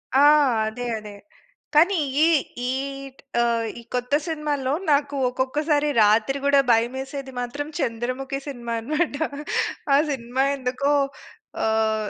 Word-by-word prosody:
ఆ! - - +6 0.5
అదే. 245 +3 -5
అదే. 210 -1 -10 0.6
కానీ, 350 +6 +5 0.3
ఈ - - +4 0.4
ఈట్ 275 +1 -4 0.2
ఆహ్, 235 -1 +1
ఈ - - -10
కొత్త 250 +2 -2
సినిమాల్లో, 295 -4 -1 0.2
నాకు 285 0 +2
ఒక్కొక్కసారి 290 +4 0 0.2
రాత్రి 220 +6 +3
కూడా 280 0 +5
భయమేసేది 265 +4 -1
మాత్రం, 285 +5 -4
'చంద్రముఖి' 255 +4 -2
సినిమా 240 -4 -5
అనమాట. 305 +4 -1 0.8
ఆ - - +6
సినిమా 255 0 -1
ఎందుకో 260 +2 -1 0.7
ఆహ్, 220 -1 +1
265 Hz, 115 wpm, -23 LUFS, 235-285 Hz, 0.8 s, ఆ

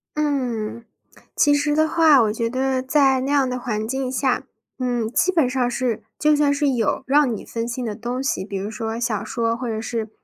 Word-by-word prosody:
嗯， 245 -7 -2 0.5
其 290 - +4
实 295 +1 +1
的 315 +1 +3
话， 315 -4 +5
我 215 -2 +2
觉 230 +1 -1
得 260 +1 -1
在 270 -1 +3
那 270 +2 -2
样 275 -3 +3
的 250 - -2
环 220 -3 -3
境 265 +1 -2
下， 260 0 0 0.3
嗯， 245 -3 -1
基 370 - +2
本 320 -8 +2
上 255 -1 0
是 235 -3 -2 0.2
就 300 0 +4
算 290 -1 +3
是 285 0 +1
有 240 -1 0
让 275 -3 +3
你 - - -8
分 230 0 -4
心 240 +1 -4
的 220 -3 -3
东 240 +4 -4
西， 270 -8 -1
比 200 - -7
如 195 +2 -3
说 225 +1 -4
小 225 -3 -2
说 230 -1 -1
或 250 - -4
者 220 -1 -3
是， 225 -1 -3
250 Hz, 230 characters per minute, -22 LUFS, 230-280 Hz, 0.5 s, 话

